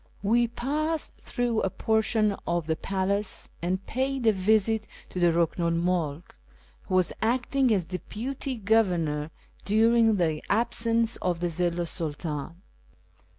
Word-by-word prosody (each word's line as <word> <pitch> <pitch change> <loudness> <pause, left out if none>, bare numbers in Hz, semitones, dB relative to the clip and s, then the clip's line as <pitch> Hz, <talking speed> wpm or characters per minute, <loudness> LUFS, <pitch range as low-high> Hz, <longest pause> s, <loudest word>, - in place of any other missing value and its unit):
We 235 +4 +3
passed 300 +7 -2
through 240 -3 -1
a 195 - 0
portion 220 -1 +1
of 170 -1 0
the 160 0 0
palace 195 +3 -2
and 185 +3 -2
paid 265 0 -1
a 220 - +6
visit 215 +2 +2 0.2
to 180 - -4
the 175 - +4
Buhnu 170 +1 +1
'l 165 0 +1
Mulk, 170 -3 -1 0.5
who 185 - -1
was 185 -1 +2
acting 250 +2 +1
as 190 -6 +2
deputy 250 +9 -4
governor 175 -9 +1 0.3
during 225 +1 +4
the 160 -5 0
absence 230 +1 +2
of 175 -2 -1
the 175 0 0
Zilhi 175 +1 0
's - - -3
Sultan. 160 +2 -4
200 Hz, 140 wpm, -27 LUFS, 175-230 Hz, 0.5 s, a